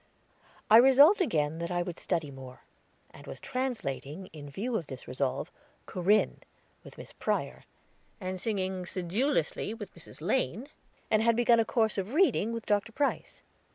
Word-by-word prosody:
I 220 Hz, -, +8 dB
resolved 280 Hz, -, +7 dB
again 160 Hz, -, 0 dB
that 170 Hz, 0 st, -3 dB
I 175 Hz, -1 st, 0 dB
would 175 Hz, -1 st, -6 dB
study 150 Hz, -4 st, -2 dB
more, 130 Hz, -1 st, -11 dB, 0.5 s
and -, -, -14 dB
was -, -, -7 dB
translating, 195 Hz, -, -4 dB
in 145 Hz, -2 st, -9 dB
view 225 Hz, -, -3 dB
of 170 Hz, -9 st, -2 dB
this 130 Hz, -1 st, -9 dB
resolve, 130 Hz, +1 st, -2 dB, 0.3 s
"Corinne," 195 Hz, +4 st, +1 dB, 0.4 s
with -, -, -14 dB
Miss -, -, -11 dB
Prior, -, -, -2 dB, 0.5 s
and 185 Hz, -2 st, -5 dB
singing 190 Hz, -4 st, -2 dB
sedulously 205 Hz, -, -1 dB
with 205 Hz, -4 st, -9 dB
Mrs. 170 Hz, -, -12 dB
Lane, 235 Hz, -, -1 dB, 0.4 s
and 215 Hz, -, +4 dB
had 230 Hz, 0 st, +3 dB
begun 235 Hz, 0 st, +4 dB
a 225 Hz, -, +3 dB
course 220 Hz, -3 st, +1 dB
of 200 Hz, +8 st, -4 dB
reading 320 Hz, -, +3 dB
with 230 Hz, -1 st, -5 dB
Dr. 205 Hz, +2 st, 0 dB
Price. 280 Hz, +4 st, -2 dB
200 Hz, 155 wpm, -29 LUFS, 170-235 Hz, 0.5 s, I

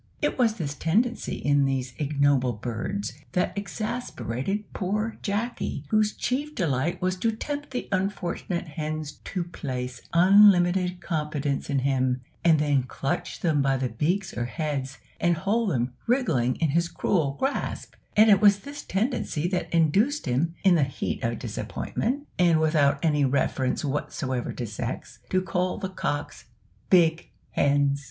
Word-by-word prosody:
It 295 Hz, -, 0 dB
was 230 Hz, -3 st, +3 dB
this 155 Hz, -9 st, -3 dB
tendency 220 Hz, -, 0 dB
in 145 Hz, -1 st, +2 dB
these 130 Hz, -2 st, -1 dB
ignoble 140 Hz, -4 st, +2 dB
birds 120 Hz, -, -4 dB, 0.2 s
that 180 Hz, -, 0 dB
exasperated 200 Hz, -, -3 dB
poor 210 Hz, +4 st, -2 dB
Jacky, 205 Hz, -, -2 dB
whose 215 Hz, -1 st, +3 dB
chief 290 Hz, +4 st, -2 dB
delight 160 Hz, -, 0 dB
was 185 Hz, 0 st, +1 dB
to 225 Hz, +5 st, +1 dB
tempt 290 Hz, +6 st, -5 dB
the 250 Hz, -2 st, -4 dB
unfortunate 185 Hz, -2 st, -2 dB
hens 155 Hz, 0 st, -4 dB
to 185 Hz, -3 st, -2 dB
place 125 Hz, -7 st, -5 dB
unlimited 180 Hz, -1 st, +5 dB
confidence 150 Hz, -4 st, -2 dB
in 140 Hz, -, +1 dB
him, 130 Hz, -1 st, +1 dB, 0.2 s
and 165 Hz, -2 st, +5 dB
then 145 Hz, -2 st, +2 dB
clutch 135 Hz, +2 st, -3 dB
them 155 Hz, -5 st, +2 dB
by 135 Hz, -1 st, +2 dB
the 130 Hz, -1 st, -1 dB
beaks 175 Hz, -, -1 dB
or 120 Hz, -, -1 dB
heads, 140 Hz, -1 st, -3 dB, 0.2 s
and 175 Hz, 0 st, +3 dB
hold 205 Hz, +5 st, +1 dB
them 125 Hz, -5 st, -1 dB
wriggling 165 Hz, -, +2 dB
in 160 Hz, -, 0 dB
his 170 Hz, +3 st, +1 dB
cruel 160 Hz, -9 st, 0 dB
grasp; 270 Hz, +1 st, -2 dB, 0.2 s
and 215 Hz, +1 st, +7 dB
it 195 Hz, -, +5 dB
was 200 Hz, -1 st, +6 dB
this 285 Hz, +4 st, -8 dB
tendency 195 Hz, -, -1 dB
that 180 Hz, -1 st, -2 dB
induced 195 Hz, -, +2 dB
him, 150 Hz, +6 st, 0 dB
in 190 Hz, -2 st, +6 dB
the 165 Hz, -, +4 dB
heat 135 Hz, -1 st, -3 dB
of 115 Hz, 0 st, 0 dB
disappointment, 275 Hz, +6 st, -3 dB
and 170 Hz, -3 st, +5 dB
without 155 Hz, -3 st, +3 dB
any 150 Hz, -2 st, +3 dB
reference 130 Hz, 0 st, 0 dB
whatever 130 Hz, -2 st, -2 dB
to 120 Hz, -, -4 dB
sex, 110 Hz, +1 st, -5 dB
to 185 Hz, 0 st, +1 dB
call 180 Hz, 0 st, -1 dB
the 190 Hz, -3 st, -4 dB
cocks 145 Hz, -9 st, -3 dB, 0.4 s
"big 170 Hz, -3 st, +4 dB, 0.2 s
hens!" 140 Hz, 0 st, +2 dB
165 Hz, 150 wpm, -26 LUFS, 140-200 Hz, 0.4 s, and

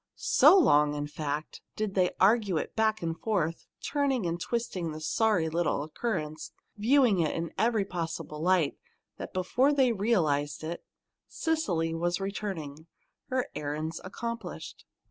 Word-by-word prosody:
So 390 Hz, -, +6 dB
long, 150 Hz, -, +4 dB
in 145 Hz, 0 st, -2 dB
fact, 150 Hz, 0 st, -4 dB
did 215 Hz, -2 st, -2 dB
they 185 Hz, -2 st, +3 dB
argue 200 Hz, -2 st, +4 dB
it -, -, -4 dB
back 220 Hz, -2 st, +1 dB
and 165 Hz, -1 st, -1 dB
forth, 170 Hz, -4 st, -2 dB, 0.2 s
turning 275 Hz, -7 st, 0 dB
and 170 Hz, 0 st, -2 dB
twisting 185 Hz, -8 st, -2 dB
the 155 Hz, -, -6 dB
sorry 180 Hz, +1 st, +1 dB
little 160 Hz, -3 st, 0 dB
occurrence, 155 Hz, -2 st, -4 dB, 0.2 s
viewing 230 Hz, -2 st, +4 dB
it 160 Hz, -2 st, +1 dB
in 170 Hz, 0 st, -4 dB
every 225 Hz, -3 st, +1 dB
possible 165 Hz, -4 st, -5 dB
light, 180 Hz, -3 st, +2 dB, 0.4 s
that -, -, -7 dB
before 245 Hz, +10 st, +2 dB
they 265 Hz, -4 st, +3 dB
realized 160 Hz, -11 st, 0 dB
it, 165 Hz, +2 st, -5 dB, 0.4 s
Cecily 185 Hz, -, -1 dB
was 175 Hz, +2 st, -1 dB
returning, 185 Hz, -7 st, -5 dB, 0.4 s
her 255 Hz, -1 st, -1 dB
errands 155 Hz, +2 st, -4 dB
accomplished. 230 Hz, +5 st, -6 dB
180 Hz, 140 wpm, -29 LUFS, 155-220 Hz, 0.4 s, So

